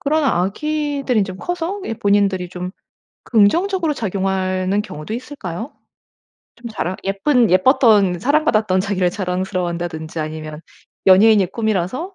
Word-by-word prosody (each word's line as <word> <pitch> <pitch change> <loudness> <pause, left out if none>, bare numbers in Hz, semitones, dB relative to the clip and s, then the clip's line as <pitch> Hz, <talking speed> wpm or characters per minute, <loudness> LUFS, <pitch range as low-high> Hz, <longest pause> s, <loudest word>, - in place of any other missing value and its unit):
그러나 290 - +1
아기들이 285 +1 -1
좀 185 -1 -7
커서 355 - -3
예 225 - -3
본인들이 200 -3 +1
좀 180 0 -5 0.6
긍정적으로 325 - +2
작용하는 190 -2 -1
경우도 155 -2 -7
있을까요? 235 - -6 0.8
좀 235 0 -8
자랑 185 -4 -3
예쁜 230 +5 +2
예뻤던 200 -3 +4
사랑받았던 220 - +2
자기를 190 -3 0
자랑스러워한다든지 175 -4 -3
아니면 155 0 -6 0.5
연예인이 200 +1 +6
꿈이라서 220 - -2
200 Hz, 335 characters per minute, -19 LUFS, 185-255 Hz, 0.8 s, 연예인이